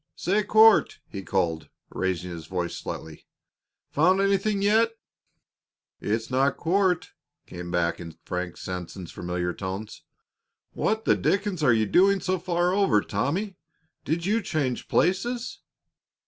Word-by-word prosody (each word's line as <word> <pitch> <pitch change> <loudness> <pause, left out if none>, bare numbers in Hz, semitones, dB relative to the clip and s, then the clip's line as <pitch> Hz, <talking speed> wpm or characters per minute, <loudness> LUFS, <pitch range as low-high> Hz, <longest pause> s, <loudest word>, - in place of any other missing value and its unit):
"Say, 200 +5 +1
Court," 220 +1 +5
he 100 - -6
called, 85 -4 -1 0.2
raising 90 -1 -2
his 85 -2 -8
voice 90 -2 -3
slightly, 80 -1 -8 0.6
"found 180 +6 +3
anything 195 +1 +1
yet?" 225 +2 +3 1.0
"It's 110 +3 -2
not 135 +2 +2
Court," 180 +1 +1 0.3
came 90 0 -8
back 85 -1 0
in 85 -2 -9
Frank 90 -1 -4
Sanson's 90 -1 -6
familiar 90 0 -3
tones. 100 +3 -6 0.7
"What 220 +1 -1
the - - +4
dickens 200 -3 0
are 135 -5 +4
you 110 -1 +3
doing 195 - +4
so 185 0 -1
far 175 0 0
over, 195 - +3
Tommy? 170 - -2 0.5
Did 170 +3 -2
you 215 +4 +1
change 145 -9 -2
places?" 230 +8 0
155 Hz, 130 wpm, -26 LUFS, -, 1.0 s, Court